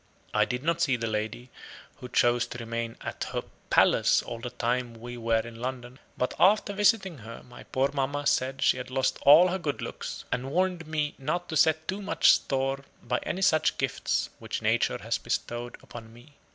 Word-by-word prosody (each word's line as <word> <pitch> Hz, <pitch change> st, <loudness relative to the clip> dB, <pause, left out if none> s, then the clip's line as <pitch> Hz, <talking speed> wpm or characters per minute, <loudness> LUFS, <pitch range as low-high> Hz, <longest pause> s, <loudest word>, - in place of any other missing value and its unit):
I -, -, +4 dB
did 125 Hz, +2 st, -4 dB
not 170 Hz, +1 st, 0 dB
see 140 Hz, -6 st, +3 dB
the 115 Hz, -2 st, -3 dB
lady, 110 Hz, +3 st, -3 dB, 0.5 s
who 125 Hz, -, -9 dB
chose 120 Hz, 0 st, +2 dB
to -, -, -7 dB
remain 115 Hz, 0 st, -4 dB
AT -, -, -4 dB
HER -, -, -4 dB, 0.3 s
PALACE -, -, +4 dB
all 115 Hz, -, -6 dB
the 125 Hz, +1 st, -5 dB
time 120 Hz, 0 st, -2 dB
we 120 Hz, +2 st, -8 dB
were 115 Hz, -1 st, +1 dB
in 115 Hz, 0 st, -10 dB
London; 125 Hz, 0 st, -5 dB, 0.2 s
but 125 Hz, -, -1 dB
after 205 Hz, +2 st, +4 dB
visiting 195 Hz, -, +2 dB
her, 115 Hz, +1 st, -10 dB
my 120 Hz, -, -13 dB
poor 135 Hz, +1 st, 0 dB
mamma 145 Hz, +1 st, -1 dB
said 135 Hz, 0 st, +1 dB
she -, -, +4 dB
had 125 Hz, -, -6 dB
lost 130 Hz, 0 st, 0 dB
all 155 Hz, +6 st, +8 dB
her 190 Hz, +2 st, -2 dB
good 150 Hz, -5 st, -3 dB
looks, -, -, -6 dB
and 125 Hz, +2 st, -2 dB
warned 180 Hz, 0 st, 0 dB
me 150 Hz, -2 st, -1 dB
not 155 Hz, +6 st, -2 dB
to 160 Hz, -, -3 dB
set 160 Hz, +1 st, +3 dB
too 195 Hz, +2 st, -3 dB
much 200 Hz, -, +4 dB
store 135 Hz, 0 st, 0 dB, 0.2 s
by 125 Hz, +1 st, -1 dB
any 190 Hz, -, -3 dB
such 155 Hz, -4 st, +3 dB
gifts 60 Hz, -1 st, -1 dB
which -, -, -5 dB
nature -, -, +2 dB
had -, -, -2 dB
bestowed 120 Hz, 0 st, -3 dB
upon 115 Hz, -2 st, -11 dB
me. 120 Hz, +5 st, -17 dB
130 Hz, 195 wpm, -28 LUFS, 120-155 Hz, 0.5 s, all